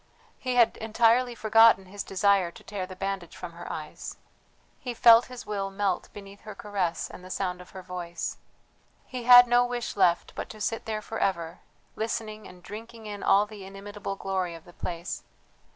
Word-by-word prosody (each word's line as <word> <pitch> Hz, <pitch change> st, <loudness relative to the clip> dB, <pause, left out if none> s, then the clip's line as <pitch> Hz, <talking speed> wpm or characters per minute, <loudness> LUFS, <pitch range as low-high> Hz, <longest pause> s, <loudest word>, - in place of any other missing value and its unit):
He 255 Hz, -1 st, -2 dB
had 235 Hz, -2 st, +4 dB
entirely 235 Hz, +2 st, +2 dB
forgotten 225 Hz, -3 st, +5 dB
his 200 Hz, +2 st, -7 dB
desire 195 Hz, -2 st, +2 dB
to -, -, -15 dB
tear 195 Hz, -3 st, -5 dB
the 185 Hz, -, -9 dB
bandage 195 Hz, -2 st, -4 dB
from 180 Hz, -, -7 dB
her 170 Hz, +1 st, -8 dB
eyes. 155 Hz, -1 st, -7 dB, 0.6 s
He 245 Hz, -2 st, -5 dB
felt 230 Hz, 0 st, +8 dB
his 250 Hz, -1 st, -9 dB
will 200 Hz, -2 st, -2 dB
melt 195 Hz, -2 st, -1 dB
beneath 200 Hz, 0 st, -11 dB
her 215 Hz, -2 st, -9 dB
caress 195 Hz, -5 st, -2 dB
and 180 Hz, -, -11 dB
the 185 Hz, -, -10 dB
sound 180 Hz, -1 st, -2 dB
of 180 Hz, -, -14 dB
her 190 Hz, -, -10 dB
voice. 175 Hz, -2 st, -5 dB, 0.7 s
He 250 Hz, -2 st, -6 dB
had 245 Hz, 0 st, +10 dB
no 240 Hz, +1 st, +5 dB
wish 245 Hz, -1 st, -3 dB
left 180 Hz, -3 st, +2 dB
but -, -, -6 dB
to 215 Hz, -, -10 dB
sit 225 Hz, +2 st, -2 dB
there 215 Hz, -1 st, -3 dB
for 225 Hz, -, -5 dB
ever, 170 Hz, -4 st, -1 dB, 0.4 s
listening 215 Hz, -1 st, -4 dB
and 180 Hz, -1 st, -15 dB
drinking 225 Hz, +2 st, -9 dB
in 205 Hz, -1 st, -6 dB
all 200 Hz, +1 st, +4 dB
the 210 Hz, -2 st, -11 dB
inimitable 195 Hz, +1 st, -6 dB
glory 190 Hz, -3 st, -2 dB
of 165 Hz, -, -13 dB
the 175 Hz, -, -15 dB
place. 170 Hz, 0 st, -5 dB
200 Hz, 185 wpm, -27 LUFS, 185-225 Hz, 0.7 s, had